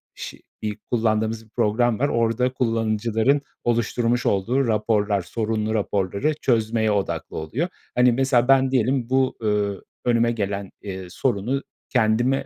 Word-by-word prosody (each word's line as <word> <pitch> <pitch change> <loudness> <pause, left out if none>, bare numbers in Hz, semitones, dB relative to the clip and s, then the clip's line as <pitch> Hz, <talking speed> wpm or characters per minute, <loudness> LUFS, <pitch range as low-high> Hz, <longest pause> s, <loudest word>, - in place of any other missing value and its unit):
şi - - -8 0.2
i 105 -1 -2
kullandığımız 110 -1 -1
bir - - -25
program 115 0 +1
var. 140 - +2
Orada 115 +2 +1
kullanıcıların 115 +2 +1 0.2
oluşturmuş 120 +1 +1
olduğu 120 +7 +1
raporlar, 105 -2 +1
sorunlu 110 +3 -2
raporları 100 - 0
çözmeye 110 -2 +1
odaklı 100 -2 -2
oluyor. 115 - -2 0.3
Hani, 125 0 +5
mesela 125 0 +2
ben 135 -1 +4
diyelim 130 -1 +1
bu, 130 0 +2
ööö, 105 -3 0 0.3
önüme 120 -1 +3
gelen, 100 -3 -3
eee, 95 -2 -6
sorunu 125 +5 -1 0.3
kendime 120 +3 +2
115 Hz, 130 wpm, -23 LUFS, 105-125 Hz, 0.3 s, Hani